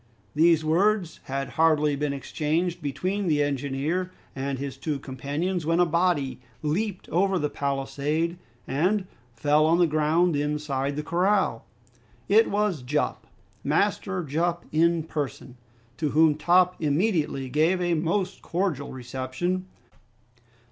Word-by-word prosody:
These 160 0 +4
words 180 +2 +2
had 135 +1 -3
hardly 155 -2 +3
been 145 0 -1
exchanged 160 +5 -2
between 185 +7 -2
the 150 -3 +3
engineer 145 +6 -1 0.3
and 135 0 -2
his 140 0 -5
two 150 -3 -3
companions 145 +7 -3
when 165 +2 +1
a 175 - +6
body 165 -6 +1 0.2
leaped 185 +6 -2
over 190 +2 +2
the 150 -3 -1
palisade 145 +5 -1 0.3
and 185 +9 +1 0.3
fell 150 +6 +3
on 165 +1 +4
the 175 - +5
ground 155 +2 +2
inside 145 -1 -1
the 150 - -3
corral. 180 - +1 0.6
It 220 +3 +5
was 205 -7 0
Jup, 150 +4 -2 0.4
Master 190 +3 0
Jup 170 +4 -1
in 165 +1 +3
person, 145 -5 -5 0.4
to 155 -2 0
whom 155 +1 +5
Top 175 +4 +3
immediately 155 -3 0
gave 160 +7 +2
a 175 -1 +1
most 170 +4 -1
cordial 170 -6 -2
reception. 130 +9 -3
155 Hz, 125 wpm, -26 LUFS, 145-180 Hz, 0.6 s, a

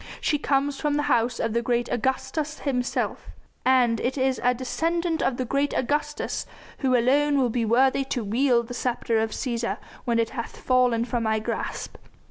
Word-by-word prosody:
She 295 - +1
comes 275 0 0
from 295 -1 +1
the 295 - +1
House 240 -4 +1
of 225 -1 -1
great 240 -1 0
Augustus 285 +5 -1
himself, 250 -3 -2 0.4
and 250 -3 +3
it 260 +3 -1
is 260 0 +1
a 250 - +5
descendant 330 +6 -1
of 245 - 0
the 255 - -1
great 275 +3 0
Augustus 295 +3 -1 0.3
who 260 -2 +2
alone 285 +4 +3
will 255 -3 +2
be 235 0 0
worthy 260 +4 +3
to 250 -3 -2
wield 235 +2 +2
the 245 - -6
sceptre 235 -2 0
of 220 0 0
Cæsar 235 0 -2 0.3
when 235 -2 +1
it 230 -1 +1
hath 235 -4 -6
fallen 250 -2 +2
from 240 0 -2
my 220 -1 +1
grasp. 215 - -4
255 Hz, 175 wpm, -25 LUFS, 235-280 Hz, 0.4 s, a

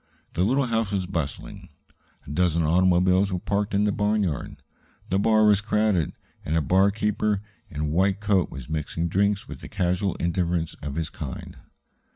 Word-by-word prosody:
The 90 - +1
little 135 +7 +2
house 115 -3 0
was 95 -2 -1
bustling; 85 -6 -5 0.6
a - - -8
dozen 85 +1 +1
automobiles 90 +3 +3
were 90 - 0
parked 100 +3 -1
in 100 - +3
the 105 - +2
barnyard. 105 -6 -1 0.5
The 95 - +2
bar 110 +1 +4
was 105 -1 +5
crowded, 105 -6 +1 0.3
and 80 - 0
a - - +2
barkeeper 105 +3 +1 0.3
in 75 - -5
a - - 0
white 95 +6 +1
coat 100 -4 +1
was 65 -4 -9
mixing 80 +2 -2
drinks 100 +3 +1
with - - -8
the - - -9
casual 95 -1 0
indifference 85 -1 -1
of 70 -1 -5
his 80 -3 -3
kind. - - -7
95 Hz, 170 wpm, -25 LUFS, 85-105 Hz, 0.6 s, was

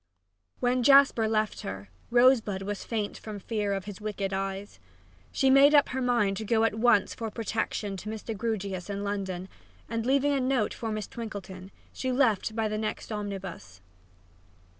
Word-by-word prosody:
When 250 +1 +1
Jasper 275 -3 +6
left 215 -1 0
her, 95 0 -7 0.2
Rosebud 240 -5 +4
was 205 0 -4
faint 215 -3 -3
from 215 -1 -7
fear 205 0 -2
of 195 -1 -2
his 205 0 -8
wicked 200 -2 -3
eyes. 195 +1 -4 0.5
She 270 -2 +3
made 280 +2 +7
up 290 - +5
her 260 0 -2
mind 235 -6 +2
to 220 - -4
go 220 +1 +2
at 225 - +2
once 220 -1 +3
for 225 -1 -4
protection 220 -2 -3
to 210 - -7
Mr. 220 +1 -5
Grewgious 200 -4 -3
in 200 0 -3
London, 190 -3 -3 0.4
and, 230 0 -2
leaving 275 +3 +2
a 275 - +1
note 255 -4 +1
for 225 -2 -4
Miss 215 -1 -3
Twinkleton, 195 -5 -7 0.2
she 260 - -2
left 225 -5 +2
by 225 -1 0
the 215 0 -2
next 215 +1 -4
omnibus. 195 - -6
215 Hz, 170 wpm, -28 LUFS, 200-240 Hz, 0.5 s, made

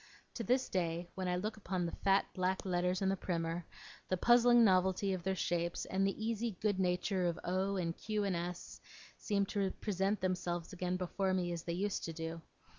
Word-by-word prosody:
To 230 - -4
this 255 +5 +2
day, 175 -1 -2
when 185 -1 -3
I 180 - +1
look 210 +5 -3
upon 185 -3 -2
the 170 - -2
fat 195 0 +2
black 185 +1 -1
letters 180 +1 +1
in 190 - +3
the 195 - +2
primer, 170 -2 -2 0.4
the 185 - +1
puzzling 240 +3 +6
novelty 190 0 +3
of 185 - -3
their 190 +2 -1
shapes, 170 -1 -1
and 195 +1 +1
the 205 +2 -3
easy 225 -3 -1
good 205 -3 +1
nature 180 0 +1
of 170 - -1
O 190 +2 0
and 170 -3 -1
Q 215 -1 -2
and 195 -3 0
S, 175 +1 -5 0.4
seem 200 -2 +1
to 200 -2 +1
present 200 0 0
themselves 180 -1 -2
again 180 0 -1
before 185 +1 0
me 175 -1 0
as 170 -1 -3
they 170 - -3
used 195 +3 -1
to 165 - -4
do. 165 0 -5
185 Hz, 200 wpm, -35 LUFS, 175-200 Hz, 0.4 s, puzzling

